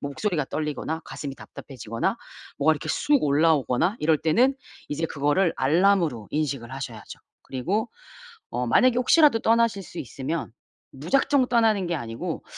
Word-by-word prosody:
뭐 140 - -4
목소리가 155 -2 -2
떨리거나 155 +1 -3
가슴이 140 -2 -7
답답해지거나 115 -4 -5 0.4
뭐가 155 +3 +4
이렇게 150 - -6
쑥 290 -2 +2
올라오거나 150 - +2
이럴 155 0 +2
때는 235 - +3 0.3
이제 155 +3 -2
그거를 155 +5 +1
알람으로 160 - +2
인식을 140 -5 -3
하셔야죠. 125 -5 -8 0.2
그리고 185 - -2 0.6
어 125 0 -2
만약에 250 - +4
혹시라도 290 -1 +5
떠나실 230 -2 +2
수 170 - -10
있으면 140 +1 -4 0.4
무작정 260 - +1
떠나는 220 -6 +2
게 170 - -1
아니고 115 -5 -5
155 Hz, 365 characters per minute, -25 LUFS, 135-210 Hz, 0.6 s, 혹시라도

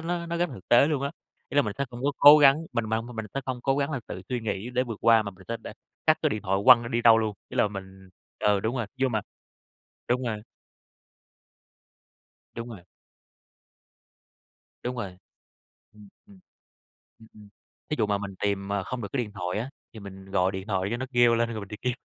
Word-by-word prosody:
nó 170 +1 -3
nó 170 0 -3
rất 175 +1 +1
thực 95 - -12
tế 120 +4 +6
luôn 145 -3 -1
á. 140 - -1 0.4
Ý - - -6
là 145 - +6
mình 105 - -3
sẽ 140 - +1
không 120 0 -8
có 145 - +1
cố 145 +1 +10
gắng, 145 +3 +5
mình 115 - 0
mà 110 0 0
mình 115 -2 -6
sẽ 135 - -1
không 130 -2 -4
cố 135 +1 +1
gắng 140 +1 0
là 135 -4 -3
tự 90 - -7
suy 125 -2 -2
nghĩ 110 +1 -3
để 125 0 +1
vượt 115 -4 -6
qua 115 -1 +5
mà 100 - -5
mình 95 0 -17
sẽ 115 - -2
đ - - -15 0.4
cất - - +5
cái - - +2
điện 105 -1 -3
thoại, 95 +1 0
quăng 125 -2 +8
nó 115 - -5
đi 120 0 -1
đâu 115 -1 +7
luôn, 110 -2 -1
ý - - -8
là - - +3
mình 95 -1 -10 0.3
ừ 105 -1 +2
đúng 115 +5 -2
rồi, 120 -4 -2
nhưng 130 -1 +1
mà 110 - +1 0.9
đúng 125 +1 +1
rồi. 110 -3 -3 2.1
Đúng 115 +1 -6
rồi. 100 -6 -10 2.0
Đúng 125 +1 -3
rồi. 95 -6 -5 0.8
Ừm, 105 -1 -15 0.2
ừm. 200 -2 -18 0.8
Ừm, 110 - -16
ừm. 105 -1 -15 0.4
Thí 150 - 0
dụ 110 - +2
mà 100 -1 0
mình 100 -1 -6
tìm, 100 -1 -1
à, 100 - 0
không 120 +4 -5
được 100 - -4
cái 130 -3 0
điện 105 - -12
thoại 90 +1 -3
á, 125 +4 -5 0.2
thì 110 - -10
mình 95 -1 -11
gọi 95 +1 +2
điện 95 +1 -6
thoại 95 -1 0
cho 120 - -1
nó 130 +2 -4
kêu 120 -1 +5
lên, 115 0 +1
rồi 110 -2 -4
mình 100 - -9
đi 105 - -7
kiếm. 125 - +1
115 Hz, 230 wpm, -27 LUFS, 100-125 Hz, 2.1 s, cố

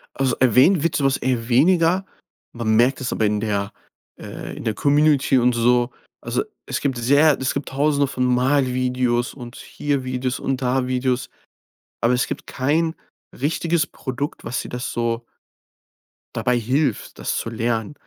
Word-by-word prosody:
Also 135 -1 +1
erwähnt 130 - +5
wird 165 +1 0
so 145 - 0
was 135 -1 +2
eher 120 -2 -2
weniger. 170 +7 +3 0.5
Man 115 -2 0
merkt 125 +5 +3
es 130 - -2
aber 110 - 0
in 105 0 0
der 100 -2 -2 0.4
äh, - - -8
in - - -8
der 110 - 0
Community 145 +1 +3
und 125 0 +3
so. 120 +1 +2 0.3
Also, - - -1 0.2
es - - -2
gibt 135 -3 -1
sehr 140 +5 +4
es 130 -1 -1
gibt 140 - -4
Tausende 140 +1 +1
von 130 -1 -2
Malvideos 125 -1 +1
und 120 -3 -10
hier 140 -3 -3
Videos 130 0 -2
und 135 -1 -2
da 125 0 0
Videos. 130 0 -1 0.7
Aber 115 +2 +3
es 125 - +1
gibt - - -6
kein 160 +5 0 0.4
richtiges 165 +3 0
Produkt, 140 +3 -5
was 120 - -2
dir - - -8
das 125 0 -4
so 115 0 -2 1.1
dabei 125 -1 +1
hilft, 135 +6 -1
das - - -2
zu - - -3
lernen. 115 +1 -2
130 Hz, 165 wpm, -22 LUFS, 120-140 Hz, 1.1 s, erwähnt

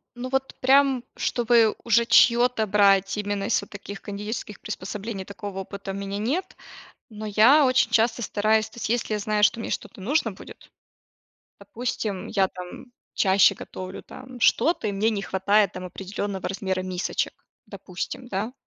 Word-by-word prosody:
Ну 245 +1 -5
вот, 265 0 -1
прям, 270 -1 +4
чтобы 235 -2 +2
уже 235 0 +3
чьё-то 240 -1 +4
брать, 195 -1 +3
именно 205 -1 -2
из 225 - +1
вот 200 - -12
таких 200 -1 -9
кондитерских 210 +1 -6
приспособлений, 200 0 -6
такого 200 -1 -7
опыта 195 0 -6
у - - -6
меня 200 0 -4
нет, 270 - -2 0.5
но 215 -2 -8
я 230 +9 +6
очень 255 -3 +3
часто 225 +1 +2
стараюсь 215 0 +1
то - - -19
есть, - - -3
если 235 -2 0
я - - -1
знаю, 210 0 -1
что 230 +2 +2
мне - - -5
что-то 205 - -5
нужно 235 +2 0
будет. 190 - -14 0.9
Допустим, 225 -5 -4
я, 195 -3 +2
там, 180 -1 -10 0.3
чаще 190 -1 +4
готовлю, 185 0 -8
там, 255 -1 -11
что-то 315 +2 +2
и - - -1
мне 205 +3 +1
не 205 -3 -3
хватает, 195 +1 +2
там, 185 0 -6
определённого 195 +1 -5
размера 190 -1 -2
мисочек, 185 0 -2 0.3
допустим, 250 - -7
да, 210 +2 -3
210 Hz, 160 wpm, -25 LUFS, 195-235 Hz, 0.9 s, я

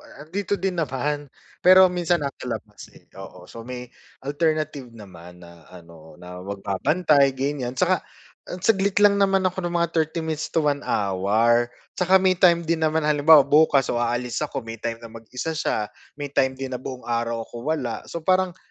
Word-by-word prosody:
a 145 - -14
'andito 200 +5 -2
din 185 -2 -3
naman 145 +1 -3 0.3
pero 185 +1 +7
minsan 175 -2 0
nasa 140 -2 -6
labas, 110 -3 -7
eh, - - -19
oo - - -11
so 115 - -11
may 125 -1 -7 0.3
alternative 155 -2 -1
naman 90 -4 -13
na 85 -2 -17
ano, 85 -3 -15
na 90 0 -10
magbabantay 135 - +1
ganiyan. 130 -2 -3
'Tsaka, 185 +4 +2 0.5
ah, - - -5
saglit 200 -2 +2
lang 200 -1 +4
naman 195 -1 +2
ako 185 0 -1
ng 175 - -4
mga 170 0 +1
30 160 +1 -1
minutes 160 -1 -3
to 160 - 0
1 145 -1 +1
hour, 105 +5 +1 0.3
'tsaka 185 +1 +4
may 190 -1 +4
time 170 -2 +4
din 165 0 -1
naman 160 0 +1
halimbawa, 150 0 +6
bukas 140 -2 +3
o 120 - -1
aalis 120 +1 -2
ako 145 -5 -4
may 115 -1 -8
time 115 0 -3
na 115 -1 -11
mag-isa 120 +7 -6
siya, 110 -9 -2 0.2
may 145 -1 -6
time 130 -1 +1
din 135 -1 -6
na 125 - -4
buong 130 -1 -8
araw 115 -1 -2
ako 120 +5 -8
wala. 140 -7 -2
So 170 -2 -7
parang 185 0 +1
140 Hz, 185 wpm, -23 LUFS, 115-170 Hz, 0.5 s, pero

